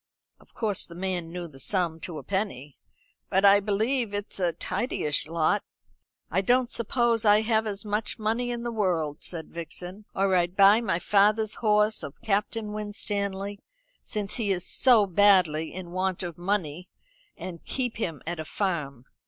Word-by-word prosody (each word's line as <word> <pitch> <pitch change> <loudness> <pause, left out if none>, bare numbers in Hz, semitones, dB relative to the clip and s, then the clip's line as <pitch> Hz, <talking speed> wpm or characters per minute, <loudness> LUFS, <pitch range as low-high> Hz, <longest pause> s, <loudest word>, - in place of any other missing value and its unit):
Of - - -24
course 210 -4 -1
the 170 - -11
man 180 -2 -3
knew 175 0 -5
the 135 -4 -15
sum 170 0 0
to 165 0 -6
a - - -7
penny. 150 -9 -3 0.5
"But 190 +2 +3
I 200 0 +8
believe 215 +2 0
it's 205 -1 -5
a 175 -2 +2
tidyish 175 - -1
lot." 160 -1 +1 0.7
"I 185 - +2
don't 245 +4 +2
suppose 235 0 +1
I 210 0 +6
have 220 0 +1
as 200 0 -4
much 210 +1 -2
money 225 +3 0
in 240 -1 -3
the 240 - -2
world," 170 -9 -1
said 165 -3 -6
Vixen, 180 +4 -7
"or 195 -1 +2
I'd 175 +1 +1
buy 200 +3 +7
my 195 -7 0
father's 210 +3 +3
horse 210 -1 +3
of 140 - -7
Captain 210 0 -1
Winstanley, 205 -1 -3 0.4
since 210 -2 -3
he 215 -4 0
is 180 -2 0
so 240 -6 +5
badly 185 -5 +3
in 180 -2 -8
want 185 0 -1
of 170 -2 -5
money, 180 -2 -2 0.5
and 170 -3 -8
keep 250 -4 -2
him 165 - -3
at 170 +1 -4
a - - -2
farm." 150 - -3
195 Hz, 170 wpm, -27 LUFS, 175-215 Hz, 0.7 s, I